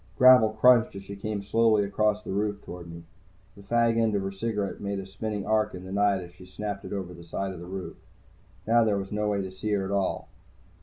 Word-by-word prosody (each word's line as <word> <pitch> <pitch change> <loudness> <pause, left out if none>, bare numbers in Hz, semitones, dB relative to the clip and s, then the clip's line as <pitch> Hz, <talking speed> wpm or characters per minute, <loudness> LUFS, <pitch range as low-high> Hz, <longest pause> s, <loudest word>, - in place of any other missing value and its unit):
Gravel 125 -3 +8
crunched 115 -1 +5
as 100 - -7
she 100 +1 -8
came 100 0 -4
slowly 110 +1 +3
across 105 +1 0
the - - -6
roof 105 +1 -1
toward 85 -1 -9
me. 85 0 -10 0.5
The 100 - -13
fag 115 +2 +2
end 110 -2 +2
of 100 - 0
her 95 - -3
cigarette 105 0 -3
made 100 0 -3
a 95 - -5
spinning 100 +1 -4
arc 110 -2 +1
in 90 0 -9
the 95 - -8
night 100 -1 +2
as 85 - -12
she 90 +1 -15
snapped 100 +1 -5
it - - -8
over 95 -3 -4
the 85 0 -12
side 95 +3 -4
of 90 - -9
the 85 - -9
roof. 95 0 -6 0.7
Now 115 +1 +4
there 105 -2 +1
was 95 -1 -5
no 105 0 0
way 100 -1 0
to 95 - -6
see 95 +3 -5
her 100 -1 0
at 95 - -4
all. 100 -2 -1
100 Hz, 245 wpm, -27 LUFS, 95-110 Hz, 0.7 s, Gravel